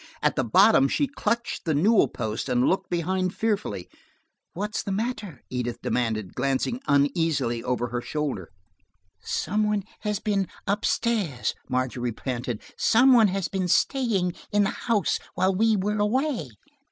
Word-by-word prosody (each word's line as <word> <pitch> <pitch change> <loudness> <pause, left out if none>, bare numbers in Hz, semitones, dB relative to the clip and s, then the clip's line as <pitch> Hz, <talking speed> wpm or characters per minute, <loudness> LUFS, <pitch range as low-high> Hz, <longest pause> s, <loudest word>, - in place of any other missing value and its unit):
At - - +2
the - - +1
bottom 135 - +5
she 290 - +1
clutched 235 -4 -2
the 160 -4 0
newel 205 +9 +4
post 110 +3 -4
and 125 0 +2
looked 190 0 0
behind 185 +2 -1
fearfully. 215 -2 -1 0.7
"What's 210 +4 -3
the 200 - -4
matter?" 210 - -3
Edith 125 -1 -2
demanded, 110 -6 -1
glancing 135 - -1
uneasily 140 -4 +1
over 125 -1 -1
her 120 0 -2
shoulder. 140 - -3 0.7
"Some 190 - -1
one 210 -1 0 0.2
has 210 -1 -1
been 200 -3 0 0.2
up 205 +2 0
stairs," 200 - 0 0.2
Margery 125 -2 -1
panted. 120 -1 -4
"Somebody 240 -2 +5
has 195 -2 -1
been 190 -2 -2
staying 200 -4 +1 0.2
in 205 0 +3
the 195 - +1
house 225 -4 0 0.2
while 190 +1 +2
we 220 +3 +3
were 210 +2 -1
away." 235 - 0
185 Hz, 145 wpm, -25 LUFS, 130-210 Hz, 0.7 s, bottom